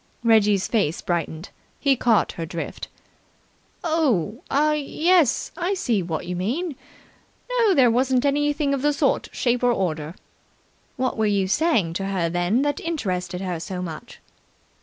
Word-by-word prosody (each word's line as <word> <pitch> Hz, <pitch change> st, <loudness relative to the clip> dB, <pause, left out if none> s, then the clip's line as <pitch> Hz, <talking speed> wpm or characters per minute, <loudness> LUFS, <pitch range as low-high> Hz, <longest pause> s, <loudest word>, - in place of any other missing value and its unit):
Reggie's 210 Hz, -4 st, +4 dB
face 200 Hz, -9 st, 0 dB
brightened. 170 Hz, 0 st, -3 dB, 0.3 s
He 280 Hz, -2 st, +3 dB
caught 235 Hz, -3 st, +2 dB
her 165 Hz, -, -6 dB
drift. 165 Hz, 0 st, -6 dB, 1.0 s
"Oh, 265 Hz, -, 0 dB
ah, 300 Hz, +2 st, +3 dB
yes, 305 Hz, 0 st, +2 dB
I 355 Hz, +3 st, -1 dB
see 230 Hz, -, 0 dB
what 165 Hz, -3 st, -4 dB
you 180 Hz, -, -4 dB
mean. 265 Hz, -, -2 dB, 0.8 s
No, 430 Hz, -5 st, +4 dB
there 250 Hz, -5 st, +5 dB
wasn't 255 Hz, +2 st, +2 dB
anything 290 Hz, 0 st, +1 dB
of 275 Hz, -, -1 dB
that 295 Hz, +1 st, +2 dB
sort 285 Hz, -1 st, +1 dB
or -, -, -17 dB
shape 245 Hz, 0 st, 0 dB
or 245 Hz, -, +4 dB
order." 165 Hz, -6 st, -2 dB, 0.8 s
"What 255 Hz, -1 st, -1 dB
were 220 Hz, -, +2 dB
you 200 Hz, -2 st, +1 dB
saying 220 Hz, -, +1 dB
to 195 Hz, -, -2 dB
her, 185 Hz, -4 st, -1 dB
then, 175 Hz, +9 st, +1 dB
that 290 Hz, 0 st, -1 dB
interested 185 Hz, -, -3 dB
her 180 Hz, -3 st, -3 dB
so 180 Hz, +2 st, -5 dB
much?" 160 Hz, -3 st, -8 dB
230 Hz, 155 wpm, -23 LUFS, 180-290 Hz, 1.0 s, there